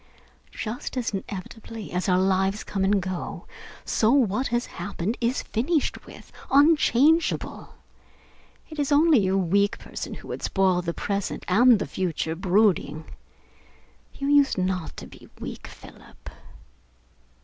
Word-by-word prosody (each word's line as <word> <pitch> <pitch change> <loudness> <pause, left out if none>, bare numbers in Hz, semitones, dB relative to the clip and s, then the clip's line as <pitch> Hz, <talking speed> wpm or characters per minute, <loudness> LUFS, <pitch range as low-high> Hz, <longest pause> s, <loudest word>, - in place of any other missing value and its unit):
Just 235 +3 -5
as 245 -3 -1
inevitably 210 +2 -7
as 180 +2 -1
our 180 - +4
lives 190 +2 +1
come 195 -2 -2
and 200 +1 +3
go, 185 -1 -5 0.4
so 220 +1 +2
what 255 -2 +2
has 240 0 -1
happened 205 +2 -4
is 240 +3 0
finished 285 +7 -1
with, - - -13 0.2
unchangeable. 300 +1 +3 1.0
It 310 - -7
is 285 0 0
only 290 - +5
a 190 +1 +1
weak 200 +4 +1
person - - -7
who - - -12
would - - -5
spoil 190 -2 +1
the 170 -1 -4
present 200 -1 -3
and 235 +5 +6
the - - -3
future, 165 -3 -2
brooding. 180 -4 +1 1.1
You 275 - -4
used 285 -3 +4
not 185 -2 -2
to - - -7
be - - -15
weak, - - -7
Philip." - - -14
205 Hz, 135 wpm, -25 LUFS, 185-255 Hz, 1.1 s, and